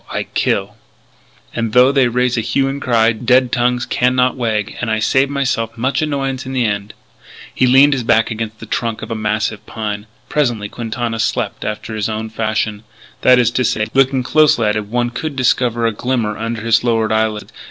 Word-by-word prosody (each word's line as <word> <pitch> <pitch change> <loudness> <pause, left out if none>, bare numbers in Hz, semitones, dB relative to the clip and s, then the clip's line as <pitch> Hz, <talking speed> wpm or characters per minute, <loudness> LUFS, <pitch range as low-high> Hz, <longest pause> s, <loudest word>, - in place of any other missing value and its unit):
I - - -2
kill. - - -2 0.8
"And 115 -2 -2
though 125 +2 +6
they 135 -3 +3
raise 125 +1 0
a 115 - 0
hue 135 +4 0
and 140 +1 -4
cry, 115 -2 +3
dead 125 +2 +2
tongues 125 0 +1
can 125 +1 +1
not 125 0 +2
wag 110 -5 -2
and 120 - -2
I 110 - +1
save 130 +5 +2
myse'f 125 -5 -2
much 130 +6 0
annoyance 135 -3 -2
in 130 - -7
the 125 -2 +1
end." 100 -1 -3 0.6
He 130 - +2
leaned 135 +3 +6
his 135 - -1
back 115 -1 +2
against 110 -1 -5
the - - -9
trunk 115 -3 -3
of 110 - -7
a - - -1
massive 110 0 -2
pine. 105 -1 -5 0.2
Presently 120 -8 -1
Quintana 115 0 -4
slept 115 -1 -2
after 110 +1 -5
his 110 0 -2
own 110 0 -4
fashion 110 -1 -2 0.4
that 125 0 +6
is 120 -2 +3
to 125 - 0
say, 110 -2 0
looking 135 -1 +2
closely 150 -4 +3
at 105 - +1
him 105 -1 -3
one 120 +1 -1
could 150 +4 -4
discover 120 -2 +1
a 115 - +2
glimmer 115 -2 -1
under 115 0 -4
his 115 0 +2
lowered 115 -3 +1
eyelids. 110 -1 -1
115 Hz, 200 wpm, -17 LUFS, 110-125 Hz, 0.8 s, though